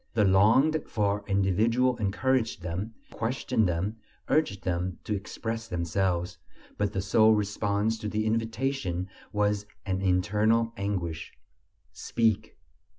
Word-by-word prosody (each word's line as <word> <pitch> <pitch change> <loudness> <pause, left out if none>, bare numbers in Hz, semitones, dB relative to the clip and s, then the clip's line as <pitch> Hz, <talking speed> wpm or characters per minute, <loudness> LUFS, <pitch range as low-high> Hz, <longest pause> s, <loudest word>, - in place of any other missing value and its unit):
The 105 -2 +4
longed 115 +11 +4
for 105 -1 0
individual 110 +6 +2
encouraged 110 -1 0
them, 95 +6 -4 0.2
questioned 115 -2 0
them, 95 +6 -2 0.3
urged 100 -11 +1
them 90 -1 -2
to 105 - -2
express 115 +3 -5
themselves, 90 -1 -1 0.4
but 105 -1 0
the 95 -3 -2
sole 110 +2 +5
response 105 +1 0
to 105 - -3
the 110 0 -1
invitation 115 -4 -1 0.2
was 105 0 0 0.2
an 95 -1 -1
internal 105 +5 +2
anguish. 95 -5 -3 0.6
Speak! 110 -2 0
105 Hz, 115 wpm, -28 LUFS, 95-115 Hz, 0.6 s, sole